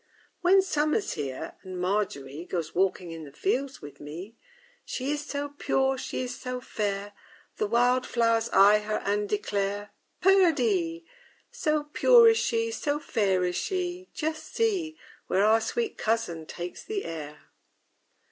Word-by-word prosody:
_ - - -40
II - - -39 0.3
When 375 +2 +6
Summer's 310 +3 0
here 135 -4 -5
and 185 -1 -7
MARGERY 175 -6 -2
Goes 170 -3 -3
walking 185 -1 0
in 165 -1 -7
the 145 - -10
fields 275 - -2
with 145 -1 -10
me, 175 +10 -8 0.5
She 265 +2 -3
is 295 0 -2
so 285 0 -4
pure, 270 -2 +1
she 260 0 -4
is 250 -1 -4
so 250 0 -5
fair, 205 -4 -3 0.4
The 210 - 0
wildflowers 235 -1 +2
eye 205 +2 +6
her 215 0 -3
and 205 +1 0
declare 205 0 -2 0.3
_Perdie! 360 -2 +3 0.5
So 305 -1 0
pure 465 +10 +6
is 450 0 +3
she, 455 0 0
so 295 -9 -1
fair 195 -9 +1
is 180 0 -1
she, 365 -1 -3
Just 315 0 -4
see, 370 -9 0 0.3
Where 195 +2 +3
our 220 +1 +5
sweet 460 - -2
cousin 175 -8 -1
takes 175 0 -7
the 415 -2 -4
air! 150 -2 -8
230 Hz, 150 wpm, -27 LUFS, 190-315 Hz, 0.5 s, When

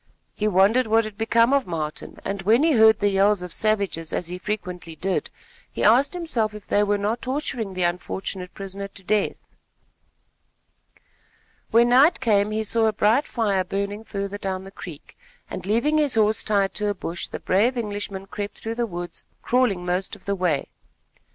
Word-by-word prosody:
He 215 - -1
wondered 210 +6 +4
what 225 +1 +3
had 215 -1 -7
become 230 +3 +3
of 275 -7 +2
Martin, 155 -3 -5
and 195 0 -3
when 225 +8 +4
he 325 - +4
heard 220 -4 +6
the 205 - +2
yells 195 0 +3
of 180 -2 -7
savages 200 -7 0
as 175 - -2
he 180 +1 -5
frequently 180 -5 -5
did, 185 +5 -2 0.4
he - - -3
asked 255 - +4
himself 235 -12 -1
if 210 - -10
they 205 - +2
were 205 0 +2
not 210 +4 -2
torturing 250 -7 -3
the 185 - 0
unfortunate 180 +1 -3
prisoner 195 0 -6
to 200 0 -15
death. 210 +2 +1 2.3
When 235 +1 +4
night 275 +7 +5
came, 210 -4 +2
he 215 +1 -1
saw 225 +1 +2
a 215 - +1
bright 220 +7 +2
fire 205 -5 0
burning 200 +3 -3
further 200 -1 -5
down 190 -1 -3
the 195 - -11
creek, 170 -6 -10 0.4
and, - - -6
leaving 285 +9 +2
his 290 -5 +1
horse 215 0 +3
tied 200 -2 +1
to 210 - -2
a 205 - -1
bush, 170 -2 -4
the - - -6
brave 230 +7 +2
Englishman 205 -3 -4
crept 205 +1 -6
through 225 - -4
the 235 0 -1
woods, 175 -3 -6 0.2
crawling 235 -8 +1
most 180 +2 -1
of - - -18
the 200 - 0
way. 175 -7 0
205 Hz, 185 wpm, -24 LUFS, 190-225 Hz, 2.3 s, heard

